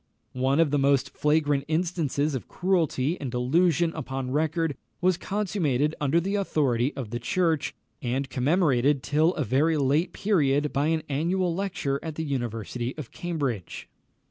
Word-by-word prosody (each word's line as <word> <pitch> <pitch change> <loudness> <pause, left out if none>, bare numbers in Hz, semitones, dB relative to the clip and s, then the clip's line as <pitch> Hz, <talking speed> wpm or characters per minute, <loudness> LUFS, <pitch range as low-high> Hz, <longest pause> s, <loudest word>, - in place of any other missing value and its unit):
One 130 +3 +1
of 165 -4 +3
the 145 - +2
most 135 -1 +2
flagrant 150 -2 +1
instances 155 -3 0
of 130 - -4
cruelty 170 -4 0
and 135 - -3
delusion 165 +7 +2
upon 135 -4 -4
record 160 +1 0 0.2
was 185 0 +3
consummated 170 -8 0
under 145 +3 +3
the 195 +4 -2
authority 140 - +1
of 125 -6 -6
the 120 - -2
Church, 165 +4 0 0.3
and 130 +3 -1
commemorated 140 -1 +2
till 155 +4 +2
a 155 - 0
very 145 +7 +2
late 145 +5 +2
period 150 -8 +1
by 140 +2 +1
an 160 -1 0
annual 170 +5 0
lecture 170 -7 -2
at 160 -2 -6
the 160 - -3
University 120 -2 -3
of 150 -6 -7
Cambridge. 140 - -4
150 Hz, 150 wpm, -26 LUFS, 135-165 Hz, 0.3 s, of